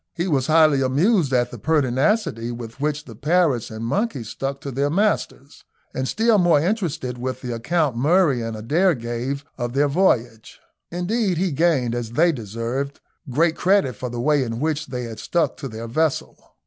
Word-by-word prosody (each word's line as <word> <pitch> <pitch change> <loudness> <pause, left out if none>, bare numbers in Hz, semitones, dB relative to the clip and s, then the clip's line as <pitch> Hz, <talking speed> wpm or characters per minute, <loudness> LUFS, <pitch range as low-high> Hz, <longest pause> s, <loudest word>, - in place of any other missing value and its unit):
He 175 +1 -1
was 135 -6 +1
highly 155 -3 +5
amused 150 - +2
at 125 -2 +1
the 120 - -8
pertinacity 135 - +1
with 115 +1 -8
which 150 0 -1
the 115 - -10
parrots 150 - +1
and 110 +1 -6
monkey 195 - -1
stuck 135 +5 -4
to 140 - -5
their 140 +3 0
masters, 180 -6 -1 0.3
and 130 0 -2
still 225 - +3
more 175 -4 +4
interested 160 - -2
with 130 +1 -4
the 125 -2 -4
account 145 +3 0
Murray 145 0 +3
and 115 -1 -4
Adair 165 - +2
gave 120 +4 -4
of 120 0 -3
their 145 +2 +3
voyage. 125 - 0 0.3
Indeed, 185 +2 -1
they 185 +1 0
gained, 140 -6 +1
as 120 -1 -4
they 170 +6 +4
deserved, 120 +3 -4 0.3
great 160 +6 +2
credit 185 - +2
for 125 +4 -5
the 120 0 -5
way 145 +3 +2
in 115 -1 -4
which 155 +1 -1
they 125 -1 -4
had 115 -2 -7
stuck 170 -1 0
to 140 - -5
their 115 -1 -7
vessel. 155 +5 -2
140 Hz, 180 wpm, -22 LUFS, 120-170 Hz, 0.3 s, highly